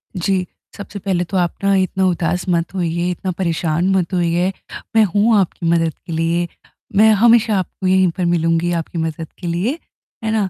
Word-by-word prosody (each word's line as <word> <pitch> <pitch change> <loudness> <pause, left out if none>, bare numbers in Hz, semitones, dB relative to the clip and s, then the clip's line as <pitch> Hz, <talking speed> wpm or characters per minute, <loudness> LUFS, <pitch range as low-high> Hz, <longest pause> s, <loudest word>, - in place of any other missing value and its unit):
जी, 185 0 0 0.3
सबसे 205 0 -7
पहले 185 -2 -1
तो 190 +2 -3
आप 175 -1 0
ना 195 0 +3
इतना 190 0 +1
उदास 180 +1 0
मत 170 +1 0
होइए, 175 0 -1
इतना 185 +1 -3
परेशान 170 0 0
मत 185 0 0
होइए, 175 +1 +1 0.4
मैं 220 - +6
हूँ 215 +2 +4
आपकी 175 -2 -2
मदद 165 -1 +2
के 170 - -6
लिए, 165 +2 0 0.5
मैं 220 +2 +6
हमेशा 230 -3 +5
आपको 185 +1 -4
यहीं 185 -1 +4
पर 180 - 0
मिलूँगी 170 0 +1
आपकी 170 - -9
मदद 160 0 -3
के 180 - -5
लिए, 195 - -1 0.4
है 220 - -1
ना? 210 -4 0
180 Hz, 185 wpm, -19 LUFS, 170-195 Hz, 0.5 s, मैं